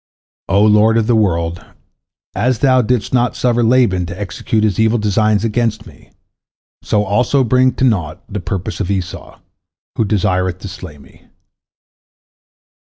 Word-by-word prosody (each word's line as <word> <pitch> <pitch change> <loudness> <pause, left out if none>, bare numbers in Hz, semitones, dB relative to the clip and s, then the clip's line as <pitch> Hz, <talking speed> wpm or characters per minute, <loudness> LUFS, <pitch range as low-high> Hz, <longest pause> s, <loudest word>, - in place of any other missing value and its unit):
O 100 +2 +3
Lord 110 +1 +4
of 115 - +1
the 120 - +2
world, 85 -5 0 0.7
as 120 +5 0
Thou 130 +1 +3
didst 120 -1 -1
not 120 -3 +1
suffer 120 -1 +1
Laban 115 -7 +2
to 90 +2 -8
execute 105 +2 -2
his 110 0 0
evil 110 +1 +2
designs 105 0 +1
against 115 -1 -1
me, 85 -9 -17 0.7
so 105 - 0
also 125 +7 +1
bring 130 +2 +2
to - - -3
naught 85 -11 -1
the 105 - -5
purpose 95 +3 -5
of 100 -3 -3
Esau, 95 -3 -5 0.6
who - - +2
desireth 95 -3 0
to - - -7
slay 90 -5 -10
me. 70 - -20
105 Hz, 150 wpm, -16 LUFS, 95-115 Hz, 0.7 s, Lord